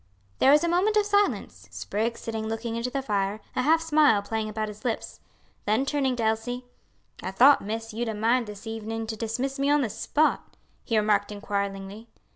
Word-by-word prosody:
There - - +5
was 295 +3 +6
a - - +2
moment 375 +5 +2
of 420 - +3
silence, 255 - 0
Spriggs 205 - -3
sitting 220 -1 -4
looking 225 +1 -3
into 235 +2 -2
the 270 +1 -3
fire, 205 -2 -1 0.2
a - - +1
half 315 +5 +4
smile 295 -10 +4
playing 220 +1 -2
about 215 0 -3
his 210 0 -10
lips; 235 -3 -3 0.5
then 220 +6 +2
turning 275 -3 0
to 235 - -2
Elsie, 225 +3 -1 0.6
"I 185 - -4
thought, 255 +9 +6
miss, 225 +2 -5
you'd 235 +1 -2
a 220 - -3
mind 230 +3 +1
this 210 0 -9
evening 225 0 -4
to 220 0 -4
dismiss 245 +5 -3
me 280 +1 +1
on 295 0 +4
the 235 -6 -1
spot," 310 +8 0 0.3
he 230 - 0
remarked 210 -1 +2
inquiringly. 200 +1 -4
225 Hz, 195 wpm, -26 LUFS, 210-265 Hz, 0.6 s, was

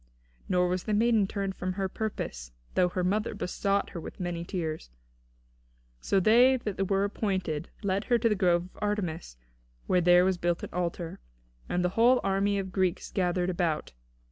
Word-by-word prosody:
Nor 180 -1 +3
was 180 0 -2
the 215 - 0
maiden 220 -2 +3
turned 195 -1 -3
from 185 0 -3
her 195 0 -1
purpose 60 - -5 0.2
though 180 -1 +3
her 180 +1 -2
mother 210 +4 0
besought 200 +1 -1
her 170 - -6
with - - -9
many 175 -2 -3
tears. 160 - -4 1.1
So 195 - +1
they 240 +7 +5
that 195 -5 -3
were 195 0 +2
appointed 190 -6 -2
led 200 +1 0
her 240 - +3
to 230 0 +2
the 220 - +3
grove 175 -4 +2
of - - -17
Artemis, 180 - -3 0.5
where 180 - +2
there 175 +1 +6
was 185 -2 +1
built 175 0 0
an - - -6
altar, 175 -1 -3 0.5
and 180 0 0
the - - +2
whole 240 +6 +4
army 195 +1 +1
of 195 - -1
the 190 - -9
Greeks 185 -2 -1
gathered 180 -1 0
about. 170 - -1
185 Hz, 180 wpm, -28 LUFS, 175-205 Hz, 1.1 s, there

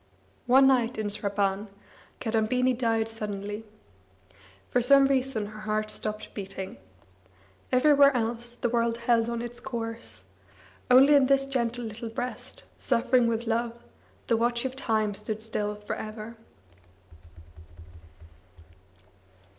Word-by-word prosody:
One 265 +2 +6
night 255 -2 +3
in 215 -1 -2
Sraban 200 0 -1 0.5
Kadambini 240 +3 +1
died 225 -2 0
suddenly. 210 -1 -5 1.1
For 245 - +3
some 275 +2 +6
reason 265 -5 0
her 215 +1 -9
heart 215 0 -1
stopped 215 0 -4
beating. 195 -1 -6 0.9
Everywhere 280 +2 +6
else 235 +1 -3
the 240 - -1
world 230 -1 +1
held 235 -1 +2
on 235 0 -3
its 240 0 -7
course; 230 -3 -6 0.7
only 265 +4 +7
in 280 -2 +5
this 275 0 +3
gentle 245 -3 -2
little 225 +1 -6
breast, 245 +3 -6
suffering 240 +1 +2
with 230 0 -1
love, 230 +1 -1 0.5
the 230 - +2
watch 235 +1 0
of 260 0 -3
time 220 -5 0
stood 215 +2 -5
still 210 -1 -3
for 210 0 -5
ever. 215 +1 -7
230 Hz, 120 wpm, -27 LUFS, 215-250 Hz, 1.1 s, only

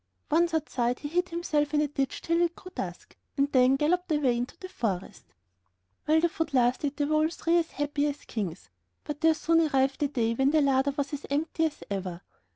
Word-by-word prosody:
Once 340 +2 +3
outside, 250 -5 0
he 290 - -6
hid 355 +4 0
himself 305 -3 0
in - - +4
a 300 - +1
ditch 275 -2 -3
till 335 +1 +1
it 345 0 +1
grew 365 - -12
dusk, - - -6 0.2
and 280 +1 +2
then 255 0 +5
galloped 350 +5 0
away 285 -5 +2
into 245 +1 -4
the 370 - -8
forest. 210 - -4 0.8
While 315 +1 +4
the 345 - +4
food 325 -5 -3
lasted 255 +3 +1
they 290 - +1
were 305 +1 +1
all 310 +1 +3
three 335 0 +1
as 330 - -2
happy 290 0 0
as 290 0 -5
kings; 190 - -5 0.3
but 295 -1 -6
there 320 -1 +5
soon 330 +1 +3
arrived 270 -2 +1
a 290 - +3
day 235 -5 0
when 270 +3 +2
the 310 +1 +3
larder 275 0 +3
was 285 0 -2
as 290 - -5
empty 315 +3 0
as 300 - -9
ever. 185 -3 -4
290 Hz, 215 wpm, -28 LUFS, 265-320 Hz, 0.8 s, then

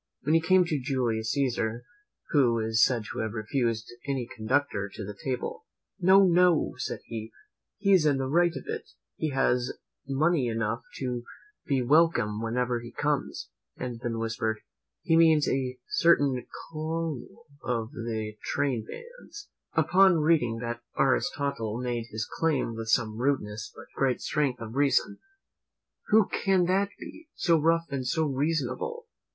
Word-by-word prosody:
When 150 +4 +1
he 165 - +5
came 185 +2 +4
to 155 -5 -1
Julius 120 -5 -1
Caesar, 120 -4 -1 0.5
who 125 -6 +4
is 110 0 +3
said 120 -4 +2
to - - -5
have 110 -1 -2
refused 115 0 -1 0.2
any 135 -4 -1
conductor 110 -2 0
to 105 - -7
the 105 - -6
table: 140 - -4 0.3
"No, 190 +2 +6
no," 180 -3 +4
said - - -4
he, 110 -1 -6 0.5
"he 200 -1 +1
is 170 -5 +5
in 140 -2 +3
the 135 - -1
right 170 +6 +3
of - - -6
it, - - -5 0.3
he 155 - -2
has 125 -2 0 0.3
money 140 0 +2
enough 115 0 -1 0.2
to 125 -2 -3 0.4
be 135 -3 +1
welcome 130 -7 +3
wherever 120 +1 0
he 120 0 -10
comes;" 145 +3 -2 0.3
and 125 -2 -5
then 115 -2 -2
whispered, 110 -1 -2 0.4
"He 165 - +3
means 160 -2 +5
a 130 -1 -1
certain 145 - +3 0.2
colonel 165 - -4 0.2
of 115 -1 -2
the 110 -5 -4
Trainbands." 415 - -4 0.2
Upon 190 -1 +5
reading 150 -8 +2
that 120 0 -4 0.2
Aristotle 130 -5 0
made 120 -2 -2
his 110 0 -3
claim 145 -8 +1
with 115 0 -5
some 110 -1 +1
rudeness, 110 -5 -1
but - - -11
great 135 -2 +1
strength 140 -5 -1
of 110 -1 -6
reason; 145 +9 +2 0.9
"Who 215 -1 +5
can 190 -2 +2
that 195 +3 +2
be, 320 0 -11
so 165 -3 +3
rough 165 +2 +2
and 130 -2 -2
so 160 +4 +1
reasonable? 150 - -2
135 Hz, 150 wpm, -28 LUFS, 115-165 Hz, 0.9 s, No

